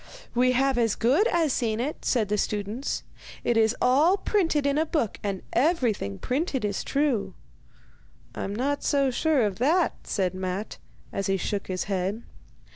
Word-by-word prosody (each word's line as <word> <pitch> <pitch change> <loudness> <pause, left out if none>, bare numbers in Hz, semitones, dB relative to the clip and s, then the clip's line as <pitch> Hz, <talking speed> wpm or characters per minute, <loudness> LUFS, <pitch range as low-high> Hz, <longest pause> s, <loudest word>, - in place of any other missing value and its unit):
'We 255 +1 +3
have 265 0 +2
as 225 -3 +2
good 280 - +3
as 330 - +2
seen 225 -2 0
it,' 280 +6 -3
said 220 -6 +1
the 210 - +1
students. 210 +7 -2 0.4
'It 240 - +1
is 225 0 +3
all 295 +10 +4
printed 330 -9 +1
in 280 +1 +2
a - - +3
book, 295 -10 -1
and 195 -2 -3
everything 240 - +1
printed 265 - -1
is 200 -1 -2
true.' 275 -7 0 1.0
'I'm 200 - -4
not 280 +5 -1
so 275 -2 +2
sure 295 0 +2
of 200 -1 -3
that,' 325 +7 +1
said 190 -3 0
Matte, 185 +3 -4 0.3
as 195 - -2
he 195 0 +1
shook 200 +1 -3
his 185 -1 -2
head. 195 +3 -2
240 Hz, 165 wpm, -26 LUFS, 205-285 Hz, 1.0 s, all